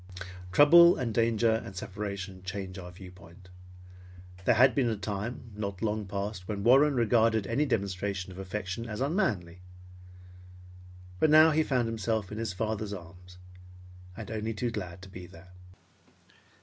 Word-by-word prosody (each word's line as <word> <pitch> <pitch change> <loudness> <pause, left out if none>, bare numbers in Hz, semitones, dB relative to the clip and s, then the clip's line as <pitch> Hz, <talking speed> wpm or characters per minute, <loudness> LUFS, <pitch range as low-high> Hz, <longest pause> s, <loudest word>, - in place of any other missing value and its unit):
Trouble 170 - +7
and 120 -3 -2
danger 115 0 +2
and 95 - -10
separation 95 -1 -6
change 95 0 -6
our 90 -1 -9
viewpoint. 90 0 -14 1.0
There 120 - +4
had 130 +3 +5
been 130 -4 +1
a 110 - -2
time 110 +4 -5
not 100 -1 -5
long 105 -2 -1
past 100 -1 -5
when 100 -2 -4
Warren 140 +5 +5
regarded 115 -2 +2
any 145 +9 0
demonstration 100 -4 -2
of 90 - -10
affection 95 +3 -5
as 105 -1 -5
unmanly, 110 - -1 1.6
but 155 - +3
now 155 +1 +7
he 155 +1 +2
found 130 -6 0
himself 110 -2 -2
in 105 - -5
his 115 -2 -2
father's 110 +1 -3
arms 90 0 -12 0.8
and 110 -2 -7
only 110 0 -3
too 120 +2 -2
glad 90 -4 -6
to - - -10
be 90 -1 -10
there. 90 0 -16
105 Hz, 150 wpm, -29 LUFS, 95-115 Hz, 1.6 s, Trouble